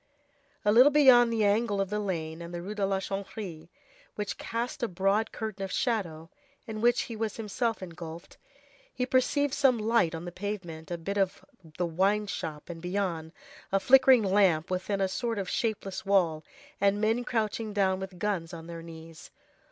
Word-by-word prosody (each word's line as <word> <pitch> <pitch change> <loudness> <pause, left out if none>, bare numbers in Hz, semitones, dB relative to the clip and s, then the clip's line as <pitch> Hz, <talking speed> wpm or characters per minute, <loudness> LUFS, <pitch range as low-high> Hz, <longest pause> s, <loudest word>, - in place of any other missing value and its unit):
A 210 - +5
little 250 +6 +8
beyond 255 -5 +6
the 220 -2 +2
angle 205 0 +2
of 195 0 -1
the 210 - 0
lane 165 -5 -3
and 170 0 -7
the 175 0 -5
Rue 200 +3 -5
de 210 -1 -3
la 195 -1 0
Chanvrerie 190 -4 -6 0.5
which 210 -1 -4
cast 240 +4 -3
a 235 - +1
broad 195 +4 +1
curtain 215 -3 -5
of 190 - -4
shadow, 180 -9 -2 0.3
in 220 -2 -6
which 240 +1 +4
he 230 - -6
was 220 -1 -3
himself 225 0 -2
engulfed, 170 -1 -9 0.5
he 250 - -2
perceived 265 +2 +1
some 270 -5 +4
light 215 -7 +2
on 165 +2 -6
the 175 - -6
pavement, 180 -5 -6
a 175 - -3
bit 200 +5 -3
of 190 -2 -1 0.3
the 180 - 0
wine 195 +5 +1
shop, 155 -6 -5
and 165 -2 -8
beyond, 180 -3 -2 0.4
a 195 - +3
flickering 255 +2 +6
lamp 190 -5 +3
within 195 +2 -1
a 190 - +3
sort 230 +4 -2
of 195 -2 -3
shapeless 205 -4 -2
wall, 175 -6 +2 0.4
and 200 +1 +3
men 225 +3 +1
crouching 220 -2 -2
down 190 -2 +1
with 190 -1 -7
guns 175 -4 -2
on 165 -1 -9
their 170 0 -7
knees. 165 -1 -11
200 Hz, 185 wpm, -29 LUFS, 175-225 Hz, 0.5 s, little